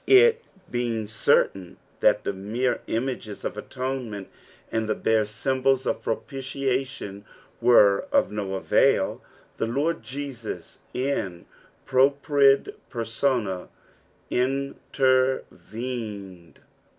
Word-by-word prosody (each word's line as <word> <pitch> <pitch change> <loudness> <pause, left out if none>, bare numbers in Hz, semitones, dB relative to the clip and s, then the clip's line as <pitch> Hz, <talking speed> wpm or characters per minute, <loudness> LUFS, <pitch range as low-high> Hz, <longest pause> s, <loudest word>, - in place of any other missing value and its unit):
It 455 +4 +7 0.3
being 120 -3 -1
certain 95 -3 +1 0.2
that - - +4
tbe - - -1
mere 115 +6 -1
images 115 -3 -3
of - - -2
atonement, 125 -3 -4 0.4
and 110 -1 -1
the 110 - +2
bare 110 -1 +2
symbols 130 +4 +1
of - - -1
propitiation 130 -5 -3 0.4
were 105 -5 +5
cf - - +3
no 100 -2 -3
avail, 95 - +2 0.4
the - - 0
Lord 145 +8 0
Jesus, 135 -4 -6 0.2
in 125 -10 -2 0.4
propria 140 +1 +4 0.3
permma, 115 -5 -1 0.6
intervened. 125 -7 -1
125 Hz, 90 wpm, -25 LUFS, 105-135 Hz, 0.6 s, It